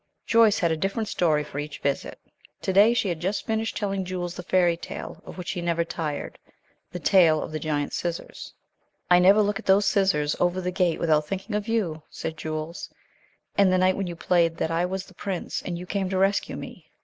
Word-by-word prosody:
Joyce 225 -2 +5
had 170 -2 +1
a - - +2
different 200 +5 -2
story 155 -4 +2
for 145 -1 -6
each 145 0 -5
visit. 140 -1 -2 0.5
To 190 - 0
day 210 +5 +6
she 220 - +1
had 170 -3 -2
just 190 +4 -2
finished 220 0 -1
telling 195 -2 -1
Jules 180 -1 -4
the 180 - -7
fairy 175 -1 +2
tale 165 - -8
of - - -9
which 180 +2 -4
he 180 -3 -4
never 170 -1 +1
tired, 155 -3 -4 0.5
the - - -5
tale 170 -3 +4
of - - -5
the 155 - -3
giant 145 -1 -2
scissors. 170 -1 -4 0.6
"I 180 - +8
never 195 +4 +6
look 205 0 -1
at - - -12
those 195 +1 +5
scissors 190 -7 +2
over 180 +1 +1
the 180 0 -2
gate 180 -2 +1
without 155 -2 +2
thinking 195 +4 -4
of 210 +1 -2
you," 190 -9 -1
said 160 - -5
Jules, 155 +1 -5 0.7
"and 200 -2 +4
the 185 - +3
night 185 0 +3
when 195 -2 -2
you 175 - -5
played 165 -1 +2
that 160 - -1
I 170 +2 +1
was 190 +1 -4
the 190 - -17
Prince, 185 0 -4
and 175 -2 -4
you 180 - -7
came 190 0 -2
to 190 - -1
rescue 195 +1 +1
me." - - -10
180 Hz, 220 wpm, -25 LUFS, 165-195 Hz, 0.7 s, I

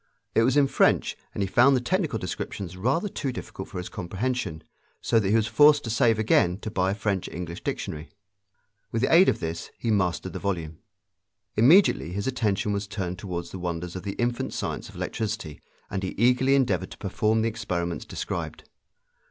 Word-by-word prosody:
It - - +4
was 130 +4 +3
in 145 - +6
French, 135 - +2 0.2
and 100 - -2
he - - -1
found 125 +8 +5
the - - +3
technical 160 - 0
descriptions 90 -1 -5
rather 130 - 0
too 140 -8 -3
difficult 125 - -7
for - - -7
his 90 - -4
comprehension, 95 -3 -3 0.4
so 115 - +2
that 100 -3 0
he 105 - +3
was 110 -2 +3
forced 145 +3 +5
to 115 - -3
save 115 -1 +3
again 95 -4 +3
to 110 - -5
buy 95 -3 +1
a 100 - 0
French 100 -4 -1
English 85 -1 -6
dictionary. 75 +1 -4 0.8
With 115 +1 -1
the - - +2
aid 180 +3 +7
of - - 0
this 80 +1 -4
he 115 - -1
mastered 95 -3 0
the - - -4
volume. 85 -5 -3 0.8
Immediately 125 - +5
his 100 +1 -3
attention 105 -5 0
was 100 0 -2
turned 95 -2 -4
toward 90 -4 -4
the 95 - -7
wonders 85 0 -4
of 95 - -4
the 100 +1 -4
infant 120 0 -2
science - - -4
of - - -14
electricity, 110 -8 -4 0.3
and 95 - -2
he 95 - -4
eagerly 125 +4 +4
endeavored 95 -9 +1
to - - -11
perform 110 +2 0
the 115 - +2
experiments 85 -5 -3
described. - - -5
105 Hz, 195 wpm, -26 LUFS, 90-120 Hz, 0.8 s, aid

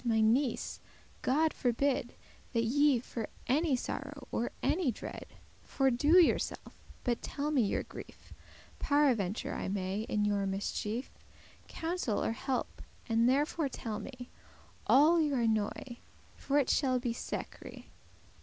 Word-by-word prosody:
my 230 -2 +2
niece, 235 +3 +1 0.4
God 310 +4 +2
forbid 250 0 0 0.4
That 230 -1 +2
ye 280 +2 +4
for 230 -3 -5 0.2
any 290 +2 +2
sorrow, 285 +3 -5
or 240 - -1
any 320 -7 +2
dread, - - -8 0.4
Fordo* 270 +5 +3
yourself: 345 - +1 0.3
but 240 -1 0
telle 295 +1 -3
me 280 -4 +3
your 205 - 0
grief, - - -12 0.5
*destroy 285 - +1 0.2
Paraventure 200 -1 -3
I - - -3
may, 195 +2 -2
in 210 -1 +1
your 200 -1 +1
mischief,* 210 +4 -3 0.6
*distress - - -11
Counsel 325 - -1
or - - +1
help; 255 +2 -3 0.3
and 230 0 +3
therefore 290 +2 +1
telle 220 -4 -5
me 250 +2 -9 0.6
All 315 +5 +6
your 285 -5 +1
annoy, 225 +2 -1 0.4
for 285 - 0
it 280 -3 +3
shall 260 -3 +2
be 240 -1 -1
secre. - - -6
250 Hz, 135 wpm, -32 LUFS, 225-285 Hz, 0.6 s, All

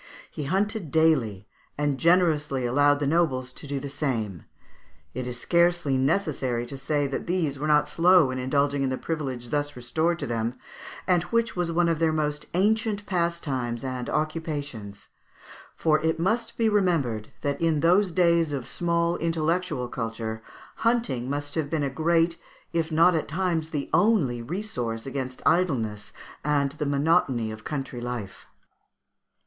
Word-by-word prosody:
He 150 - -5
hunted 195 +2 0
daily, 130 -11 +2 0.3
and 145 -2 0
generously 155 -6 +2
allowed 145 +4 +4
the 145 - 0
nobles 135 -5 +1
to 145 - -9
do 140 0 -2
the 140 - -6
same. 120 - -3 0.7
It 125 0 -4
is 125 -1 -5
scarcely 170 -2 +2
necessary 130 -4 0
to 135 +3 -7
say 145 +1 0
that 140 - -4
these 165 -6 0
were 150 - -2
not 150 -1 +4
slow 175 -5 +5
in 130 - -3
indulging 140 +2 +1
in 135 - +1
the 130 - -2
privilege 130 -7 -4
thus 145 0 -1
restored 160 +8 0
to - - -3
them, 115 +1 -2 0.5
and 180 -2 +3
which 230 +5 0
was 175 -2 -1
one 170 +1 +2
of 165 -2 +1
their 165 -1 +3
most 150 -1 -1
ancient 210 +2 +1
pastimes 145 - -1
and 130 -2 -4
occupations; 145 -9 -3 0.7
for 155 -1 +2
it 160 0 0
must 220 +7 0
be 230 - +2
remembered 165 - +1
that, 140 +2 -2
in 160 -3 +2
those 180 +4 +4
days 170 -3 +3
of 135 -4 -4
small 170 0 +1
intellectual 165 -4 -1
culture, 115 -2 -4 0.4
hunting 230 - 0
must 145 +1 -3
have 155 -3 -1
been 155 -2 0
a 140 - -1
great, 165 +3 +1 0.3
if 165 -1 0
not 165 +3 +5
at 160 - -1
times 165 -1 -1
the 150 -4 -3
only, 170 - +3
resource 120 - -4
against 130 -1 -5
idleness 115 - +1 0.3
and 140 -2 +1
the 150 0 -3
monotony 140 -6 +2
of 110 -1 -9
country 135 -4 -4
life. 120 -5 -6
150 Hz, 155 wpm, -26 LUFS, 130-170 Hz, 0.7 s, slow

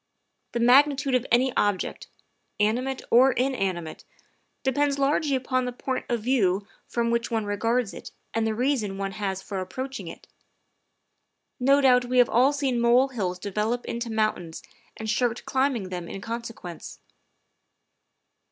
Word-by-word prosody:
The 235 - -1
magnitude 270 +3 +4
of 255 0 +1
any 250 +2 +3
object, 205 -2 -1 0.5
animate 250 +6 0
or 255 +2 +6
inanimate, 195 -11 -2 0.6
depends 280 +1 +1
largely 280 +1 +1
upon 255 0 0
the 250 - -2
point 260 +1 -4
of 235 -3 -1
view 205 -6 +2 0.2
from 235 -1 -1
which 235 0 0
one 225 -3 -1
regards 225 +2 0
it - - -9 0.2
and 225 0 0
the 220 - -1
reason 235 -6 0
one 195 0 -3
has 195 -2 -3
for 195 -1 -4
approaching 260 +8 -5
it. - - -10 1.3
No 275 +3 +4
doubt 250 -2 +5
we 250 +1 -1
have 245 -1 +5
all 255 +5 +4
seen 275 -4 -1
molehills 235 -6 +2
develop 210 +5 -2
into 235 0 -4
moun 220 -1 +2
tains 165 -2 -9 0.3
and 220 - -6
shirked 235 +2 0
climbing 260 -7 0
them 175 -2 -5
in - - -6
consequence. 225 -5 -7
235 Hz, 145 wpm, -26 LUFS, 210-260 Hz, 1.3 s, or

